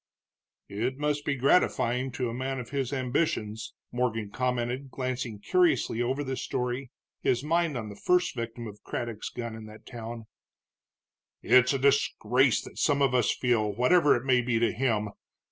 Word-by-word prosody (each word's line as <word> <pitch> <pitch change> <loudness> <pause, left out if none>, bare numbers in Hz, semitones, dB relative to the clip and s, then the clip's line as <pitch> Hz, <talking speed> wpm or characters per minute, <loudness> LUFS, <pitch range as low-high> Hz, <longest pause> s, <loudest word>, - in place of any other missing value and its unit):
"It 120 +6 -2
must 150 0 -1
be 140 - 0
gratifying 130 -2 +2
to 125 0 -2
a 115 - -4
man 130 +2 -3
of 120 0 -8
his 135 -2 -1
ambitions," 125 -5 -1 0.2
Morgan 115 -4 -1
commented, 125 +2 -2
glancing 130 -3 -3
curiously 325 - +2
over 130 +4 0
the 135 -1 -3
story, 125 +1 -3 0.3
his 125 +1 +1
mind 165 -2 +1
on 110 -3 -5
the 100 - -9
first 180 - +2
victim 115 0 -5
of 105 -1 -9
Craddock's 115 -3 -4
gun 115 -2 -5
in 110 -1 -9
that 110 0 -13
town. 115 -2 -7 1.2
"It's 125 +1 +5
a - - +1
disgrace 130 -2 +2
that - - -10
some 140 -2 +3
of 135 -2 +2
us 125 -4 +3
feel, 110 -4 +1
whatever 145 - +4
it 120 +1 -3
may 130 -2 +4
be 120 -1 0
to 115 0 +2
him. 110 -4 0
125 Hz, 165 wpm, -28 LUFS, 115-135 Hz, 1.2 s, It's